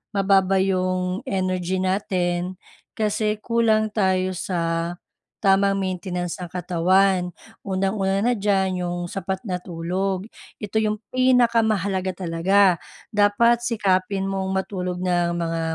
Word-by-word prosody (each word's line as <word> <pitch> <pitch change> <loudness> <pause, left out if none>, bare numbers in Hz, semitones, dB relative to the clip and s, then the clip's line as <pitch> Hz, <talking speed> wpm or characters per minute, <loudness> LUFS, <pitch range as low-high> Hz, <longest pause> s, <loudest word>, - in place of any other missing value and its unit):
mababa 195 -1 +3
yung 185 -1 0
energy 185 -1 -1
natin, 185 -2 -1 0.4
kasi 215 0 0
kulang 220 -2 +2
tayo 185 -3 +1
sa 170 -1 -2 0.4
tamang 195 0 +3
maintenance 180 -2 -3
ng 175 - -6
katawan. 180 +1 +2 0.3
Unang-una 195 +1 0
na 245 - +3
diyan, 190 -3 0
yung 175 0 -2
sapat 190 +1 -3
na 180 -2 -3
tulog, 185 +3 -2 0.3
ito 220 +1 -1
yung 215 0 0 0.2
pinakamahalaga 225 -7 +2 0.2
talaga. 180 +2 +3 0.3
Dapat 220 +4 +4
sikapin 195 -4 0
mong 195 -1 -2
matulog 185 -2 -2
ng 175 -1 0
mga 165 -1 -2
190 Hz, 110 wpm, -23 LUFS, 180-200 Hz, 0.4 s, Dapat